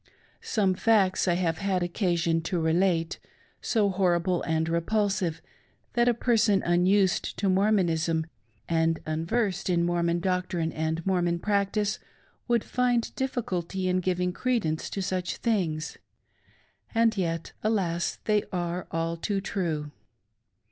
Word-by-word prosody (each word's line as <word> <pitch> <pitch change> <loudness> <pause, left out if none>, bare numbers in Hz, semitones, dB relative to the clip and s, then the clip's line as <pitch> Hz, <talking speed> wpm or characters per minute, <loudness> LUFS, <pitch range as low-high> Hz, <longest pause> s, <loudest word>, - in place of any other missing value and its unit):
Some 195 -4 +1
facts 195 -2 +2
I 175 - +3
have 165 -3 0
had 190 -2 0
occasion 170 -3 0
to 180 - 0
relate, 165 +1 +1 0.4
so 210 -4 +2
horrible 180 -1 +1
and 160 0 0
repulsive, 175 0 0 0.5
that 240 0 +3
a 240 - +2
person 225 -4 +2
unused 185 +2 +2
to 200 - 0
Mormonism 175 -5 +2 0.4
and 165 0 +1
unversed 185 +5 -1
in 170 -1 +2
Mormon 170 0 +1
doctrine 180 -2 -1
and 160 +1 -2
Mormon 175 -2 +1
practice 205 +2 0 0.5
would 235 -3 +2
find 245 -1 +1
dificulty 190 -8 -2
in 185 0 +2
giving 180 0 0
credence 200 -11 -1
to 195 - -3
such 185 -2 -2
things 175 -9 -1 0.5
— - - -32
and 225 -1 +3
yet, 165 -4 -2
Alas! 180 -6 0
they 210 -1 +3
are 175 -1 -3
all 165 0 -1
too 195 +4 -2
true! 165 -7 -3
180 Hz, 125 wpm, -27 LUFS, 170-205 Hz, 0.5 s, I